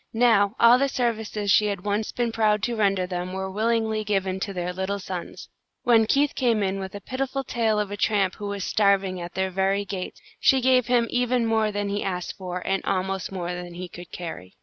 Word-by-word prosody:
Now, 220 -3 +4
all 235 +2 +7
the 275 0 +2
services 220 -5 -1
she 210 +1 +5
had 200 -3 -2
once 210 +1 -1
been 240 -1 -1
proud 215 -2 +2
to 240 - 0
render 195 -4 +2
them 180 0 -4
were 190 0 -3
willingly 220 +1 0
given 195 -2 -1
to 200 - -3
their 180 -1 -3
little 190 +2 -2
sons. 185 -3 -7 0.4
When 230 -3 +4
Keith 285 +3 +2
came 230 -5 +1
in 195 0 -1
with 190 0 -6
a 200 - -7
pitiful 270 +4 -3
tale 225 -4 0
of 205 -1 -2
a 205 - -4
tramp 200 -3 +1
who 205 - -5
was 200 -1 -3
starving 195 -3 +2
at 175 +1 -8
their 190 0 0
very 195 +2 +1
gates, 190 -2 -5 0.2
she 270 - +4
gave 255 -1 +3
him 240 -1 +3
even 245 -1 +1
more 220 -1 +1
than 205 0 -2
he 205 +1 -1
asked 180 -2 -3
for, 180 -2 -6
and 195 0 0
almost 190 0 -2
more 180 -2 -3
than 175 -1 -7
he 180 +1 -6
could 175 0 -11
carry. 130 - -7
200 Hz, 215 wpm, -25 LUFS, 190-225 Hz, 0.4 s, all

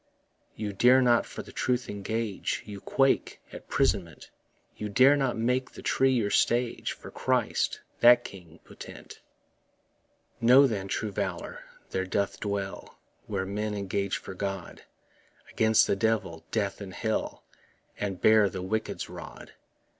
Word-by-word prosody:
You 105 -2 -4
dare 125 +6 +5
not 120 -2 +3
for - - -7
the - - -13
truth 125 -1 -1
engage, 105 +1 -3
You 100 -1 -8
quake 135 0 +1
at - - -10
'prisonment; - - -1 0.4
You 105 - -5
dare 130 +7 +6
not 135 -4 0
make 125 +3 0
the - - -12
tree 135 0 +2
your 110 -5 0
stage 120 0 +1
For - - -12
Christ, - - 0 0.2
that 120 0 +7
King 85 -4 -12
potent. - - -12 1.2
Know, 125 +4 +7
then, 100 -7 -2
true 105 +2 -2
valour 95 -3 -4 0.3
there 95 0 -2
doth 100 +1 -1
dwell 100 -1 -4 0.3
Where 95 - -2
men 105 +2 -3
engage 100 0 -2
for - - -9
God 95 -2 -5 0.7
Against 110 -1 +4
the - - +1
Devil, 95 -6 -1
death 100 -2 -2
and 95 -1 -8
hell, 110 +1 -2 0.6
And 100 -3 -3
bear 110 -2 +5
the 95 0 -6
wicked's 110 +4 -3
rod. - - -10
105 Hz, 140 wpm, -28 LUFS, 100-120 Hz, 1.2 s, that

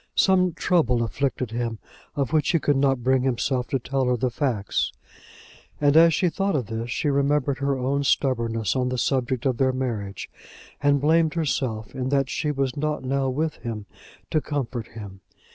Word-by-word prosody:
Some 185 -2 +3
trouble 125 -11 +2
afflicted 130 0 -2
him 115 -1 -2 0.4
of 140 +1 -1
which 155 -1 +2
he 165 - +3
could 145 -1 +1
not 135 -2 +2
bring 130 +1 +3
himself 125 0 0
to 135 - 0
tell 135 +1 -1
her 125 0 +1
the 125 +1 0
facts, 120 -6 -1 0.9
and 145 0 +3
as 165 +1 +7
she 180 +3 +2
thought 195 +3 0
of 130 -5 0
this 115 +2 -4
she 150 - -1
remembered 140 -1 +1
her 140 -1 0
own 135 +2 0
stubbornness 115 -6 +1
on 125 -1 +1
the 125 - -2
subject 130 0 0
of 130 -3 +1
their 130 0 +3
marriage, 115 -7 -4 0.5
and 145 -1 +3
blamed 160 +1 +3
herself 130 -9 -2
in 130 0 -3
that 135 -1 +1
she 150 - -1
was 135 -3 -1
not 150 0 -2
now 135 +1 0
with 155 +4 -2
him, 110 -4 -6 0.5
to 155 - +2
comfort 130 -6 -3
him. 100 -4 -10
130 Hz, 180 wpm, -24 LUFS, 120-145 Hz, 0.9 s, as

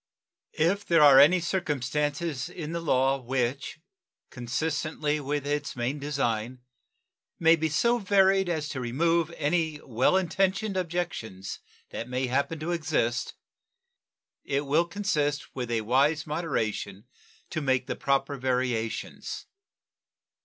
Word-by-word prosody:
If 185 +6 +2
there 165 -5 +4
are 140 -2 +9
any 180 +6 +7
circumstances 150 -3 -2
in 160 -2 -6
the 170 0 -3
law 135 -3 +2
which 130 +3 -2 0.5
consistently 150 +4 -2
with 145 0 -2
its 145 0 -2
main 130 +4 -2
design 125 -4 -2 0.8
may 165 0 +5
be 160 -1 -1
so 235 +11 +2
varied 195 -2 +3
as 155 -3 -1
to 135 - -4
remove 165 +7 +1
any 155 0 0
well 130 +8 +2
intentioned 195 +3 0
objections 170 - -4 0.3
that 115 - -5
may 130 +1 -1
happen 140 +6 0
to 165 +3 -2
exist, 145 -8 -1 1.1
it 140 +1 -1
will 155 +5 +3
consist 155 -6 -1
with 125 -2 -4
a 115 -1 0
wise 140 +7 +2
moderation 140 - -3 0.5
to 155 - -2
make 130 -2 +1
the - - -3
proper 140 +1 0
variations. 125 -3 -2
145 Hz, 125 wpm, -27 LUFS, 130-165 Hz, 1.1 s, are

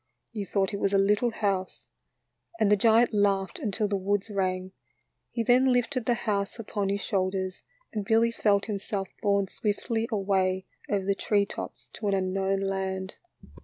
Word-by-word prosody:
You 205 -4 -4
thought 195 0 0
it 200 - -2
was 200 0 +1
a - - +6
little 205 +4 +3
house," 195 -4 -2 0.7
and 210 -2 +3
the - - +7
giant 225 +3 +4
laughed 195 -2 +1
until 210 0 -1
the 200 - -1
woods 200 +2 -1
rang;. 185 -1 -1 0.6
He 230 - -2
then 255 +3 +4
lifted 245 0 0
the 240 - +3
house 200 -1 -1
upon 205 -3 -2
his 200 0 -1
shoulders 190 -2 -1 0.3
and 210 -2 -2
Billy 225 +2 +3
felt 205 -3 +2
himself 200 -2 -3
borne 200 -2 +2
swiftly 225 +3 -2
away 190 -2 +1 0.2
over 200 -2 0
the 200 - +2
tree 200 0 +1
tops - - -8
to 210 - -4
an 200 - +2
unknown 195 +1 0
land. 190 0 -2
200 Hz, 165 wpm, -28 LUFS, 195-220 Hz, 0.7 s, the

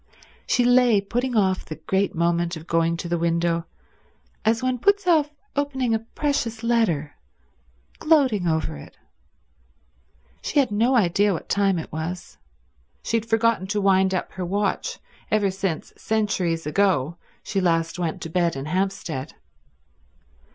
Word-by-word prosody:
She 245 - +2
lay 245 -3 +5
putting 240 +4 -2
off 190 -2 +2
the 155 - -7
great 195 +3 -1
moment 170 0 0
of 160 - -11
going 165 0 +1
to 170 - -5
the 170 0 -1
window 170 0 0 0.8
as 225 +3 +1
one 255 -1 0
puts 405 - +2
off 315 -5 +3 0.3
opening 265 -4 0
a 225 - +2 0.2
precious 235 -6 -1
letter, 195 -12 +1 0.9
gloating 265 - +3
over 160 - -1
it. 70 - -13 1.4
She - - -3
had 275 -6 +3
no 230 +5 +2
idea 200 -1 +3
what 165 - -6
time 195 -2 +2
it 160 - -6
was; 160 - -6 0.6
she - - -1
had 225 0 -4
forgotten 225 -3 +2
to 205 +2 -1
wind 190 -1 +3
up 185 - -3
her 185 - -5
watch 200 +3 -1 0.3
ever 205 -2 +2
since, 190 -4 -3
centuries 190 -7 -1
ago, 170 -2 +1 0.3
she 195 - -1
last 165 -1 0
went 165 -3 -2
to 165 - -5
bed 170 -2 +1
in 135 0 -5
Hampstead. 165 -5 -3
195 Hz, 145 wpm, -24 LUFS, 170-230 Hz, 1.4 s, lay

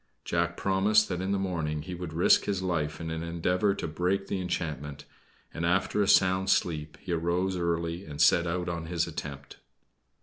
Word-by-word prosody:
Jack 85 0 0
promised 105 +3 +3
that 90 -1 -2
in 95 +1 -1
the 100 - +1
morning 80 -6 -2
he 90 - -6
would 90 -2 -6
risk 85 +3 +4
his 100 -2 -1
life 80 -5 -1
in 80 -1 -4
an 80 0 -3
endeavor 90 +4 0
to - - -4
break 90 +5 -1
the 95 -1 -3
enchantment; 75 -5 -4 0.5
and, 85 - -4
after 90 +4 +1
a 100 - +2
sound 95 0 +4
sleep, 75 -5 0
he 90 - -6
arose 85 +3 0
early 85 0 -1
and 75 -1 -8
set 85 0 +5
out 90 +1 -2
on 85 -1 -4
his 85 0 0
attempt. 70 -4 -7
85 Hz, 190 wpm, -28 LUFS, 80-95 Hz, 0.5 s, set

